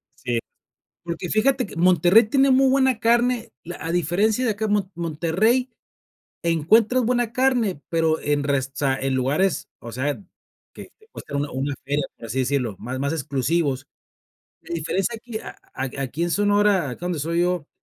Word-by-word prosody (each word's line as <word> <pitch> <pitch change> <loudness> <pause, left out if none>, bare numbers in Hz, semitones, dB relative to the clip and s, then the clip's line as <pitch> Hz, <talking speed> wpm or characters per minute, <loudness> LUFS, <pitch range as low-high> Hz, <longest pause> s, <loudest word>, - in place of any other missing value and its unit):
Sí. 120 -1 -2 0.6
Porque 170 0 -5
fíjate 250 +3 +2
que - - -11
Monterrey 180 +5 +5
tiene 270 0 +4
muy 265 0 +5
buena 265 -3 +3
carne, 240 - +2
la 175 +1 -7
a 165 - -2
diferencia 200 - +1
de 225 - +2
acá 215 +1 -3
en 210 - -1
mo 195 -2 0
Monterrey 175 - +1 0.7
encuentro 215 +10 +3
buena 240 -1 0
carne, 240 - +1
pero 160 -2 +1
en 145 -1 0
resta 135 -1 0
en 135 0 -1
lugares, 145 +7 0
o 115 - -9
sea, 140 +4 -2 0.5
que - - -9
te 435 0 -24
cuesta 145 - -8
una 145 +1 -1
una 135 +2 -2
feria, 145 +1 0
por - - -10
así 115 +4 -3
decirlo, 125 -5 0
más 130 +2 -5
más 140 +2 -1
exclusivos. 140 -1 -1 0.7
La 170 - -7
diferencia 185 +7 -1
aquí 225 -1 -7
a - - -9 0.5
aquí 145 +5 -3
en 175 - -1
Sonora, 205 -5 +2
acá 170 +8 -7
donde 175 -3 -2
soy 165 +4 0
yo, 180 -3 0
170 Hz, 170 wpm, -23 LUFS, 145-220 Hz, 0.7 s, Monterrey